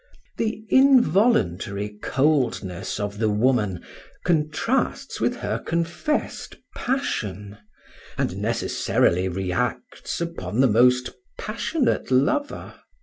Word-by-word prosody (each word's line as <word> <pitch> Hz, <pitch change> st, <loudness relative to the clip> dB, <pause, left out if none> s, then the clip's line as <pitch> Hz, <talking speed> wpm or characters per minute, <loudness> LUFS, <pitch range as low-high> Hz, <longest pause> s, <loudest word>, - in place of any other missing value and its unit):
The 220 Hz, -1 st, -2 dB
involuntary 150 Hz, -, +3 dB
coldness 130 Hz, -, 0 dB
of 105 Hz, 0 st, -4 dB
the 110 Hz, -1 st, +2 dB
woman 105 Hz, -4 st, +1 dB, 0.4 s
contrasts 155 Hz, -3 st, 0 dB
with -, -, +1 dB
her 105 Hz, +2 st, -3 dB
confessed 170 Hz, -, -2 dB, 0.2 s
passion, 105 Hz, -, -3 dB, 0.6 s
and -, -, -1 dB
necessarily 90 Hz, +2 st, +1 dB
reacts 95 Hz, -, -3 dB
upon 170 Hz, -9 st, -4 dB
the 135 Hz, -, +6 dB
most 125 Hz, +2 st, +3 dB, 0.3 s
passionate 245 Hz, +6 st, -1 dB
lover. 215 Hz, -, 0 dB
125 Hz, 85 wpm, -24 LUFS, -, 0.6 s, the